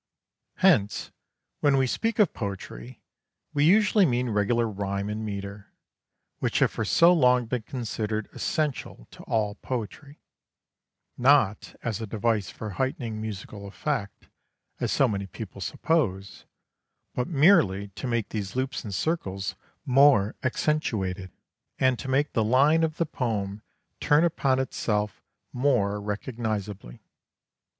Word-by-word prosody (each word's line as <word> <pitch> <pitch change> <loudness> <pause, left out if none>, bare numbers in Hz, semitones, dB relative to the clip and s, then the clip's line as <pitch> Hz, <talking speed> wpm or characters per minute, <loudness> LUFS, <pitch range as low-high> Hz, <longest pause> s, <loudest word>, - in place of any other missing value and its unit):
Hence, 135 - +2 0.5
when 140 -2 +3
we 135 - +3
speak 225 - -1
of 210 -6 +3
poetry 95 - -7 0.5
we 145 0 +3
usually 205 +3 +5
mean 125 -6 +1
regular 115 +3 +1
rhyme 100 -1 -3
and 105 +1 -3
metre, 100 -1 -6 0.7
which - - 0
have - - +3
for 110 - -3
so 170 +11 +5
long 125 -6 +4
been 120 +1 -2
considered 110 -3 -3
essential 150 - -3
to - - -13
all 105 -2 0
poetry, 130 +6 -6 1.0
not 125 -6 +3
as 115 -1 -2
a 110 - -4
device 110 -1 0
for 110 -2 -7
heightening 125 - -3
musical 100 -1 -7
effect, 105 -1 -4 0.5
as - - -1
so 135 - +3
many 100 -3 -3
people 100 0 -9
suppose, 100 - -1 0.7
but 125 - -2
merely 145 - +4
to 100 +6 -6
make 120 -3 -1
these 100 -2 -4
loops 130 0 -2
and 100 -4 -5
circles 95 - -2 0.3
more 130 -6 +5
accentuated, 110 -10 -1 0.5
and 130 -2 +2
to - - -6
make 140 +3 +1
the 115 - +2
line 140 +8 +4
of 160 -1 -1
the 170 - +1
poem 105 -8 -3 0.4
turn 145 +2 +4
upon 140 -6 +2
itself 105 -6 -2 0.3
more 120 -6 +1
recognizably. 105 - -4
115 Hz, 130 wpm, -26 LUFS, 100-140 Hz, 1.0 s, usually